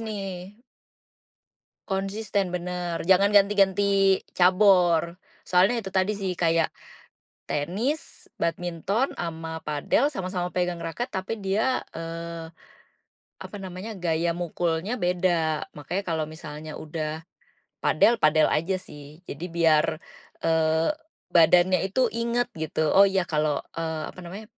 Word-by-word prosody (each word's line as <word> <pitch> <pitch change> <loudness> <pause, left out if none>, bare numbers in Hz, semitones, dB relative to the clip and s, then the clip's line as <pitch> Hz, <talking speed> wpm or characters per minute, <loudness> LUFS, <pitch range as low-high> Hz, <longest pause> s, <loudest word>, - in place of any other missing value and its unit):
nih 195 -3 -6 1.3
konsisten 195 -1 -1
bener, 175 -1 -3
jangan 195 +2 +5
ganti-ganti 195 -1 +4 0.2
cabor, 180 -3 +4 0.3
soalnya 190 +6 +4
itu 190 - -6
tadi 190 +2 +1
sih 195 -2 -2
kayak 165 -1 +2 0.8
tenis, 200 - -3
badminton, 175 - -1
sama 160 -1 -5
padel 150 - +1
sama-sama 185 -6 -3
pegang 180 -1 -1
raket 240 +9 -3
tapi 195 +4 -3
dia, 210 +6 +1 0.2
eee, 165 0 -6 0.9
apa - - -9
namanya 190 +3 -7
gaya 170 -1 0
mukulnya 175 +4 -1
beda. 175 -4 +1
Makanya 175 +7 -4
kalau 160 -2 -1
misalnya 155 0 -8
udah 155 0 -4 0.6
padel, 235 - +4
padel 155 0 +4
aja 175 +5 +1
sih. 150 -1 -12
Jadi 155 0 -7
biar, 160 -2 +3 0.5
eee, 160 0 +2 0.4
badannya 175 +2 +5
itu 225 +7 +1
ingat 235 +1 -1
gitu, 155 0 -1
"Oh 200 +1 +7
ya 190 -1 +1
kalau," 150 -3 0
eee, 160 -1 -3
apa - - -11
namanya, 185 +5 -8
180 Hz, 115 wpm, -25 LUFS, 165-195 Hz, 1.3 s, Oh